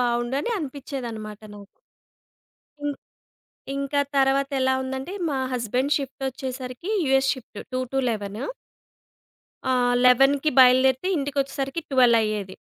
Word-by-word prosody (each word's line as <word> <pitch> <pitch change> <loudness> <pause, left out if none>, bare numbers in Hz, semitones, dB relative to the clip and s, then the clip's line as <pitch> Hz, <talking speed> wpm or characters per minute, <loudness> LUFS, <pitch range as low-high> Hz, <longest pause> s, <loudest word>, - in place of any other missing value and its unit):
బావుండు 240 +1 0
అని 475 - -3
అనిపించేదన్నమాట 250 - -6
నాకు. 200 0 -13 1.1
ఇం 290 - 0 0.9
ఇంకా 280 +1 0 0.2
తర్వాత 275 +1 +3
ఎలా 260 0 +3
ఉందంటే 265 +6 -5 0.2
మా 275 - -1
హస్బాండ్ 250 +4 0
షిఫ్ట్ 270 -1 -7
వచ్చేసరికి 260 +3 -6 0.2
యూఎస్ 270 0 +3
షిఫ్ట్ 235 -5 -12
2-11 245 -5 -2 1.3
ఆహ్, 245 -1 +2
11కి 270 +4 +5
బయలుదేరితే 260 +5 +5
ఇంటికొచ్చేసరికి 275 +1 -2
12 245 -3 +5
అయ్యేది. 210 -3 -3
260 Hz, 105 wpm, -24 LUFS, 245-275 Hz, 1.3 s, 11కి